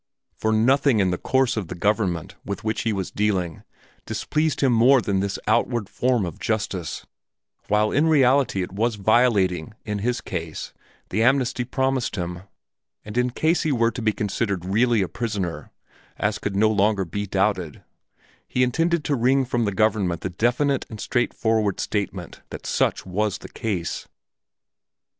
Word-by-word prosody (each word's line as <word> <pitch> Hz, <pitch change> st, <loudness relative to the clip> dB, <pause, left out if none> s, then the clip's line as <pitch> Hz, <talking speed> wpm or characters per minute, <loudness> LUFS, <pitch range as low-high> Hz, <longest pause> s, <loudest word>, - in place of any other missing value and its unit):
For 110 Hz, -, 0 dB
nothing 125 Hz, +2 st, +3 dB
in 95 Hz, -2 st, +2 dB
the 90 Hz, -, -2 dB
course 130 Hz, -1 st, +1 dB
of 105 Hz, -6 st, -3 dB
the 90 Hz, -, -6 dB
government 95 Hz, -3 st, 0 dB
with 100 Hz, -, -5 dB
which 110 Hz, 0 st, -1 dB
he 115 Hz, -, 0 dB
was 95 Hz, -3 st, -3 dB
dealing 95 Hz, -6 st, -1 dB, 0.5 s
displeased 155 Hz, 0 st, -1 dB
him 135 Hz, -3 st, +4 dB
more 125 Hz, +4 st, +6 dB
than 100 Hz, -4 st, 0 dB
this 100 Hz, 0 st, -2 dB
outward 120 Hz, -5 st, +1 dB
form 125 Hz, -5 st, +1 dB
of 85 Hz, -, -7 dB
justice, 100 Hz, -6 st, -3 dB, 0.6 s
while 105 Hz, +1 st, +2 dB
in 150 Hz, +3 st, +3 dB
reality 135 Hz, -, +3 dB
it 90 Hz, -, -7 dB
was 110 Hz, +4 st, 0 dB
violating 105 Hz, -5 st, +2 dB
in 105 Hz, -1 st, -2 dB
his 120 Hz, +4 st, -1 dB
case 85 Hz, -5 st, -5 dB, 0.4 s
the 110 Hz, -, +1 dB
amnesty 125 Hz, 0 st, +2 dB
promised 130 Hz, -1 st, -1 dB
him, 90 Hz, -2 st, -4 dB, 0.6 s
and 105 Hz, +1 st, -8 dB
in 125 Hz, 0 st, +2 dB
case 160 Hz, +6 st, +1 dB
he 155 Hz, -, 0 dB
were 115 Hz, -3 st, +2 dB
to 125 Hz, -, -6 dB
be 110 Hz, -1 st, +2 dB
considered 100 Hz, -3 st, -2 dB
really 110 Hz, +2 st, +2 dB
a -, -, -2 dB
prisoner 105 Hz, -8 st, -4 dB, 0.5 s
as 105 Hz, +1 st, 0 dB
could 100 Hz, -1 st, -3 dB
no 110 Hz, +2 st, +4 dB
longer 100 Hz, -1 st, +2 dB
be 100 Hz, +4 st, -4 dB
doubted 95 Hz, -5 st, -1 dB, 0.6 s
he 125 Hz, -, +1 dB
intended 165 Hz, +6 st, +1 dB
to 145 Hz, -, 0 dB
wring 130 Hz, +2 st, +3 dB
from 120 Hz, -2 st, 0 dB
the 100 Hz, -, 0 dB
government 100 Hz, -4 st, +1 dB
the 90 Hz, -, -3 dB
definite 125 Hz, +8 st, +1 dB
and 110 Hz, -, -8 dB
straightforward 110 Hz, -4 st, 0 dB
statement 95 Hz, -4 st, -3 dB
that -, -, -8 dB
such -, -, 0 dB
was 100 Hz, +2 st, -1 dB
the -, -, -11 dB
case. 95 Hz, -7 st, -3 dB
110 Hz, 165 wpm, -23 LUFS, 95-125 Hz, 0.6 s, more